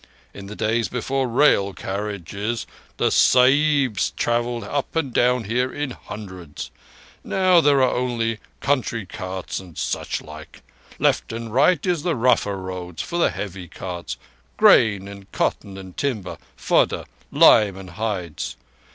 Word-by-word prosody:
In 100 -1 -9
the 105 - -8
days 110 +1 0
before 130 +2 -1
rail 115 -6 +3
carriages 100 +3 -4 0.3
the - - +2
Sahibs 135 -2 +4
travelled 120 0 0
up 145 +2 -3
and 145 -6 -1
down 125 0 +3
here 125 +5 0
in 145 -2 -3
hundreds. 95 -10 -9 0.5
Now 185 -2 +4
there 140 -3 +4
are 130 - +2
only 115 -3 -1 0.2
country 125 -6 0
carts 95 0 -5
and 90 -5 -13
such - - -2
like. 75 0 -12 0.3
Left - - +1
and 115 -1 -6
right 140 +5 +3
is 175 -4 +1
the 170 0 0
rougher 115 -5 +2
road 90 -2 -7
for 175 - -3
the - - +4
heavy 95 -3 -6
carts—grain 85 - +1
and 100 -1 -11
cotton 95 -1 -2
and 95 -2 -10
timber, 110 -10 -3 0.2
fodder, - - +1 0.3
lime 100 -3 +6
and 95 -2 -10
hides. 90 -5 -4
110 Hz, 135 wpm, -22 LUFS, 95-130 Hz, 0.5 s, lime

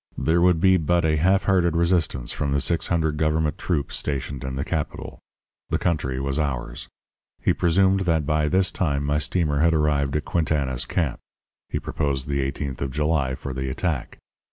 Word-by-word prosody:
There 85 +2 +2
would 90 -2 +4
be 95 +1 +5
but 85 +1 +1
a 75 -1 +2
half 95 +5 +3
hearted 90 -4 +2
resistance 85 -7 +1
from 70 -1 -2
the 70 - +2
six 80 +5 0
hundred 80 -4 0
government 75 0 0
troops 75 -7 -1
stationed 70 -2 -3
in 65 0 -4
the 70 - -2
capital. 80 -3 -4 0.5
The - - +1
country 75 -7 -1
was 70 +1 -1
ours. 70 -5 -3 0.5
He - - +2
presumed 95 +3 +3
that 80 -3 +2
by 75 +1 +1
this 95 +3 +2
time 70 -6 -1
my 75 +1 +1
steamer 75 -1 0
had 85 +1 +3
arrived 75 -2 +1
at 75 - -1
Quintana's 70 -7 0
camp. 75 -8 -1 0.5
He - - -2
proposed 70 -3 -2
the 70 -1 0
eighteenth 70 0 -4
of 70 - -1
July 75 -1 0
for 65 0 -6
the 65 +1 -3
attack. 75 0 -3
75 Hz, 180 wpm, -24 LUFS, 70-85 Hz, 0.5 s, be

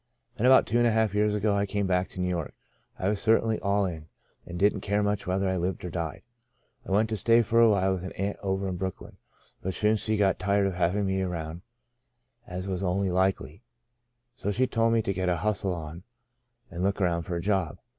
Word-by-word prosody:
Then 125 0 +1
about 130 0 +7
two 120 - +1
and 120 - +4
a - - +3
half 110 -2 +1
years 105 0 +2
ago 105 0 +1
I 100 0 0
came 100 0 -1
back 90 0 +1
to - - -11
New 90 - 0
York. 85 -4 -3 0.4
I 95 - -2
was 100 -1 0
cer 115 0 +4
tainly 110 -1 -1
all 100 0 +1
in, 80 -4 -6 0.4
and 85 - -6
didn't 100 +1 +2
care 100 +2 0
much 105 -1 -1
whether 95 +1 0
I 95 0 0
lived 90 +1 -2
or 90 - -5
died. 80 -2 -4 0.3
" 125 - -41
I - - -7
went 105 +3 +3
to 110 - -2
stay 115 +4 +4
for 115 +2 +2
a 115 -1 +7
while 95 -2 +2
with 95 -1 -4
an 95 - -6
aunt 100 +2 -3
over 95 0 -1
in 90 -1 -3
Brooklyn. 95 0 -6 0.4
But 95 -1 -3
she 105 +3 +2
soon 110 0 0
got 100 -2 +2
tired 100 +2 +2
of 95 - 0
having 90 +3 0
me 95 0 0
around 85 -2 -4 0.9
(as 90 -2 -5
was 95 -1 -2
only 95 0 0
likely); 95 - 0 0.7
so 100 - -4
she 125 +6 +2
told 115 -2 +1
me 115 -1 +2
to 100 - -1
get 95 -1 -1
a 90 - +1
hustle 100 0 -1
on 80 0 -7
me 90 - -13 0.7
and 90 0 -4
look 100 +1 0
round 85 -3 0
after 90 - -3
a - - -1
job. 95 -4 0
95 Hz, 240 wpm, -27 LUFS, 90-105 Hz, 0.9 s, about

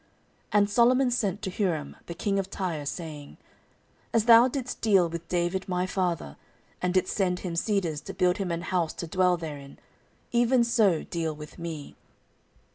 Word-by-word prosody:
14:002:003 - - -36 0.4
And 205 -1 +4
Solomon 250 +3 +4
sent 205 -5 -1
to 190 - -2
Huram 170 -8 -1
the 170 - -6
king 195 +3 0
of 195 -1 -3
Tyre, 170 -8 -3
saying, 150 -3 -7 0.7
As 225 -2 +2
thou 235 +1 +8
didst 255 -1 -4
deal 195 -6 +4
with 170 0 -7
David 175 +2 -1
my 180 0 0
father, 175 - -2 0.4
and 180 - +1
didst 185 0 +1
send 180 -3 0
him 175 -3 -4
cedars 170 -5 0
to - - -8
build 180 0 +2
him 195 -3 -2
an 170 0 -2
house 175 -4 -1
to - - -5
dwell 180 +1 +2
therein, 145 -4 -8 0.5
even 240 +1 +3
so 215 -8 +2
deal 165 -2 -3
with 150 +3 -11
me. 160 -4 -6
180 Hz, 175 wpm, -27 LUFS, 165-205 Hz, 0.7 s, thou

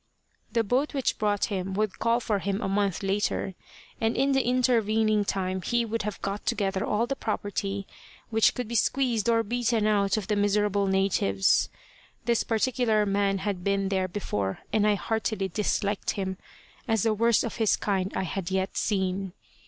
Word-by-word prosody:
The 230 -1 +2
boat 260 +8 0
which 270 - 0
brought 205 -1 +1
him 190 0 -3
would 210 -1 -1
call 230 +1 +2
for 215 -4 -1
him 195 +1 -2
a - - -2
month 200 -1 0
later, 195 0 0 0.5
and 225 +1 +1
in 275 +1 +3
the 270 0 +3
intervening 225 -4 +2
time 190 -1 -2
he 235 +5 0
would 230 0 -2
have 210 -1 -4
got 200 +1 -3
together 195 -1 0
all 215 +2 +1
the 275 - -2
property 200 -3 -3 0.5
which 220 -1 +4
could 250 -3 -3
be 235 - -6
squeezed 235 -1 +1
or 230 -1 +3
beaten 230 -1 0
out 205 -1 +2
of 210 - -2
the 210 - 0
miserable 205 0 +2
natives. 190 - +2 0.6
This 235 -1 +2
particular 225 -2 +1
man 200 0 +1
had 195 -4 -2
been 195 0 +1
there 190 -1 0
before, 105 - -3
and 215 -1 +3
I 210 - +4
heartily 210 -2 -2
disliked 205 +1 -1
him, 190 -1 -2 0.5
as 225 -4 +2
the 225 - +3
worst 230 +1 +3
of 230 - -4
his 220 -3 +3
kind 195 -2 -1
I - - 0
had 185 0 -3
yet 190 0 -1
seen. 190 -2 -1
205 Hz, 175 wpm, -27 LUFS, 195-225 Hz, 0.6 s, which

